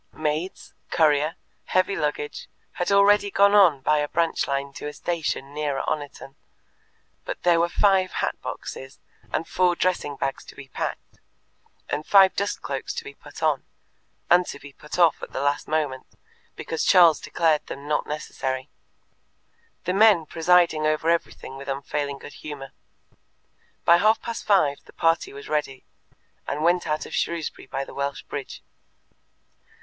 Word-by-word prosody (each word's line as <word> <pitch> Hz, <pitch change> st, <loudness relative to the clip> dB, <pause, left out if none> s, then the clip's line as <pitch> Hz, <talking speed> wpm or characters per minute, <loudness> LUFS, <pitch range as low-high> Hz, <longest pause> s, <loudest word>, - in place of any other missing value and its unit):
Maids, 155 Hz, +4 st, -3 dB, 0.2 s
courier, 155 Hz, 0 st, +2 dB, 0.3 s
heavy 185 Hz, +2 st, +1 dB
luggage, 150 Hz, 0 st, -3 dB, 0.2 s
had 175 Hz, -, -2 dB
already 200 Hz, +1 st, +5 dB
gone 200 Hz, +1 st, +4 dB
on 175 Hz, -9 st, +6 dB
by 150 Hz, +3 st, +2 dB
a 145 Hz, -, 0 dB
branch 165 Hz, +2 st, 0 dB
line 140 Hz, 0 st, -2 dB
to 145 Hz, -, -7 dB
a 150 Hz, -, -6 dB
station 155 Hz, -5 st, -3 dB
nearer 145 Hz, -2 st, -2 dB
Oniton, 145 Hz, -2 st, -4 dB, 0.9 s
but -, -, -6 dB
there 175 Hz, -1 st, +4 dB
were 170 Hz, +1 st, +2 dB
five 190 Hz, -1 st, +2 dB
hat -, -, -1 dB
boxes 135 Hz, +1 st, -7 dB, 0.3 s
and 160 Hz, -, -2 dB
four 180 Hz, -1 st, +2 dB
dressing 175 Hz, -6 st, -1 dB
bags 135 Hz, 0 st, -3 dB
to -, -, -13 dB
be 140 Hz, -, -11 dB
packed, -, -, -6 dB, 0.7 s
and 145 Hz, +1 st, -2 dB
five 195 Hz, -2 st, +6 dB
dust 200 Hz, +1 st, -2 dB
cloaks -, -, -4 dB
to -, -, -4 dB
be 430 Hz, -, -9 dB
put -, -, -12 dB
on, -, -, +2 dB, 0.6 s
and 175 Hz, 0 st, +4 dB
to -, -, -6 dB
be 145 Hz, -1 st, -13 dB
put 150 Hz, -, -8 dB
off 170 Hz, -4 st, +4 dB
at -, -, -8 dB
the -, -, -3 dB
last 145 Hz, +1 st, 0 dB
moment, 150 Hz, -4 st, -2 dB, 0.5 s
because 160 Hz, -, -3 dB
Charles 175 Hz, -5 st, +6 dB
declared 160 Hz, -3 st, +1 dB
them 140 Hz, +1 st, -8 dB
not 150 Hz, 0 st, 0 dB
necessary. 135 Hz, -3 st, -4 dB, 1.1 s
The 180 Hz, -, -1 dB
men 200 Hz, -5 st, +5 dB
presided 170 Hz, 0 st, +3 dB
over 155 Hz, +1 st, +1 dB
everything 165 Hz, -5 st, -3 dB
with 140 Hz, +1 st, -10 dB
unfailing 140 Hz, +1 st, -3 dB
good 145 Hz, -, -11 dB
humour. 140 Hz, -3 st, -7 dB, 1.1 s
By 170 Hz, -, +7 dB
half 215 Hz, +4 st, +3 dB
past 230 Hz, -, -6 dB
five 155 Hz, -9 st, +3 dB
the -, -, -17 dB
party 165 Hz, 0 st, +1 dB
was 140 Hz, +1 st, -10 dB
ready, 150 Hz, -4 st, -2 dB, 0.6 s
and 150 Hz, +2 st, -2 dB
went 175 Hz, 0 st, +2 dB
out 155 Hz, 0 st, -1 dB
of -, -, -10 dB
Shrewsbury 170 Hz, -2 st, -3 dB
by 135 Hz, -, -3 dB
the -, -, -12 dB
Welsh 140 Hz, 0 st, -3 dB
Bridge. 140 Hz, -2 st, -7 dB
155 Hz, 160 wpm, -24 LUFS, 145-175 Hz, 1.1 s, By